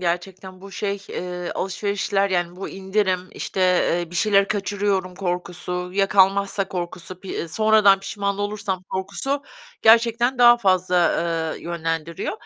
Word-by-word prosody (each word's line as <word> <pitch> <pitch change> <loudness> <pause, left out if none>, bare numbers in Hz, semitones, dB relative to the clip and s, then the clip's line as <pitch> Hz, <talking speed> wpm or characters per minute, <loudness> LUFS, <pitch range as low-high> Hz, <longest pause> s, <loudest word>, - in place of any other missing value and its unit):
gerçekten. 185 +1 -4
Bu, 195 +1 -11
şey, 200 +1 -2
eee, 180 -1 -5
alışverişler 200 +1 -1
yani 175 -1 -1
bu 195 - -6
indirim, 190 -1 -1
işte, 190 - -5
eee, 175 -2 +2
bir 175 - -11
şeyleri 200 +1 +3
kaçırıyorum 200 -2 -1
korkusu, 180 0 -4
ya 195 0 +2
kalmazsa 195 0 +2
korkusu, 180 0 -6
pi 185 -3 -5
sonradan 215 0 +4
pişman 200 0 -3
olursam 205 -2 -3
korkusu 200 +10 -3 0.4
gerçekten 235 +3 +4
daha 240 0 +8
fazla, 185 -4 +1 0.6
eee, - - -16
yönlendiriyor. 165 -1 -3
195 Hz, 130 wpm, -22 LUFS, 180-205 Hz, 0.6 s, daha